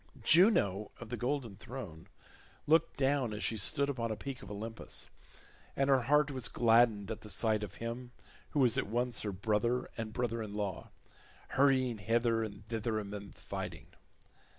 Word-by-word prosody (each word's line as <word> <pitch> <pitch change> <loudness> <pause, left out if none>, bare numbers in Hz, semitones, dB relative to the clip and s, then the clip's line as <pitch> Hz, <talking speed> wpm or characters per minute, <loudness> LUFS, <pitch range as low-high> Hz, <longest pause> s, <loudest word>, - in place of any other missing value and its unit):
Juno 105 - +4
of 120 - -9
the 120 - -2
golden 120 -3 -2
throne 100 -10 -8 0.6
looked 160 +2 +3
down 135 -4 +1
as 105 - -4
she 115 - +1
stood 140 +7 +2
upon 120 -5 -2
a 110 - -1
peak 130 +4 -6
of - - -10
Olympus 110 +2 -5 0.7
and 135 0 +2
her 135 -1 +5
heart 145 +3 +3
was 130 -5 -2
gladdened 115 -2 +3
at 110 - -5
the 105 - -10
sight 110 0 +2
of 100 -2 -6
him 120 +2 -5 0.4
who 150 - -1
was 125 -4 +4
at - - -2
once 120 +2 -1
her 105 - -2
brother 110 +5 +1 0.2
and 115 -1 -2
her - - -11
brother 115 -2 -1
in 105 -2 -6
law, 100 -4 -3 0.6
hurrying 130 -4 +3
hither 115 +1 +2
and 105 -1 -8
thither 110 0 -1
amid 100 -1 -7
the - - -20
fighting. - - -6
115 Hz, 175 wpm, -33 LUFS, 105-130 Hz, 0.7 s, her